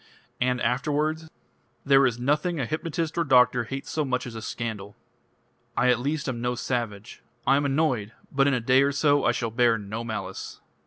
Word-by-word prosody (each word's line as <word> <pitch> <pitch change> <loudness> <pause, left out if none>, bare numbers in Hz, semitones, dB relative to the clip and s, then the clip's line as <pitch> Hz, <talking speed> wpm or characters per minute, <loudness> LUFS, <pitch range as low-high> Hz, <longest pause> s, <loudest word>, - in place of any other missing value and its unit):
"And 125 0 +1
afterwards?" 150 +6 0 0.6
"There 135 -1 +5
is 120 -2 -2
nothing 150 +6 0
a 130 - 0
hypnotist 160 +3 -3
or - - +3
doctor 125 -4 +4
hates 135 +4 -6
so 155 - 0
much 130 -3 -1
as 120 - -7
a 110 - -6
scandal. 105 -4 -5 0.8
I 125 - +3
at 125 - +1
least 145 +3 -2
am 120 -3 -3
no 125 0 -1
savage. 115 -4 -4 0.2
I 135 - +5
am 145 +1 +1
annoyed.... 135 -7 0 0.2
But 135 0 +3
in 140 - +3
a - - 0
day 130 +3 +4
or 140 0 +2
so 145 0 +2
I 120 - +4
shall 115 -1 -2
bear 115 0 +3
no 105 +3 -5
malice...." 110 -2 -6
125 Hz, 195 wpm, -26 LUFS, 115-145 Hz, 0.8 s, There